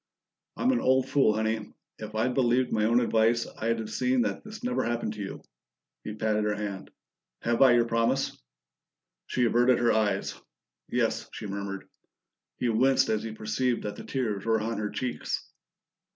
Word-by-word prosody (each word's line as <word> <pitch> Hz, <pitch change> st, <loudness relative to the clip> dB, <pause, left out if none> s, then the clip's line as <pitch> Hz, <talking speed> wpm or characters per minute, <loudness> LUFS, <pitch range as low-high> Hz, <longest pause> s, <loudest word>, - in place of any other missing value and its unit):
"I'm 255 Hz, -, +2 dB
an 250 Hz, -, +2 dB
old 130 Hz, 0 st, +3 dB
fool, 135 Hz, -7 st, +3 dB
Honey. 110 Hz, -1 st, -2 dB, 0.2 s
If 110 Hz, 0 st, -7 dB
I'd 115 Hz, +3 st, +1 dB
believed 125 Hz, 0 st, +2 dB
my 105 Hz, -1 st, +2 dB
own 120 Hz, +2 st, +4 dB
advice, 115 Hz, 0 st, +2 dB
I'd 115 Hz, +1 st, 0 dB
have 110 Hz, -1 st, -5 dB
seen 125 Hz, -1 st, +2 dB
that -, -, -3 dB
this 215 Hz, +2 st, -10 dB
never 250 Hz, 0 st, 0 dB
happened 120 Hz, -2 st, -2 dB
to 105 Hz, -, -10 dB
you." 95 Hz, -, -6 dB, 0.6 s
He 105 Hz, -, -5 dB
patted 110 Hz, -1 st, 0 dB
her 105 Hz, 0 st, 0 dB
hand. 100 Hz, -2 st, -5 dB, 0.5 s
"Have 115 Hz, 0 st, +1 dB
I 130 Hz, -2 st, +8 dB
your 120 Hz, -1 st, +4 dB
promise?" 115 Hz, 0 st, +1 dB, 0.9 s
She 125 Hz, -, +1 dB
averted 120 Hz, +2 st, +4 dB
her 120 Hz, -1 st, +3 dB
eyes. 110 Hz, -1 st, +1 dB, 0.6 s
"Yes," -, -, 0 dB
she -, -, -6 dB
murmured. 100 Hz, -1 st, -5 dB, 0.7 s
He 125 Hz, -, -1 dB
winced 130 Hz, +4 st, +3 dB
as 110 Hz, -1 st, +1 dB
he 110 Hz, -1 st, -5 dB
perceived 120 Hz, +3 st, -1 dB
that 105 Hz, -1 st, -4 dB
the -, -, -9 dB
tears 110 Hz, -7 st, -2 dB
were 115 Hz, -1 st, +2 dB
on 115 Hz, +1 st, -2 dB
her 105 Hz, -1 st, -2 dB
cheeks. 125 Hz, +2 st, -3 dB
115 Hz, 175 wpm, -28 LUFS, 110-125 Hz, 0.9 s, I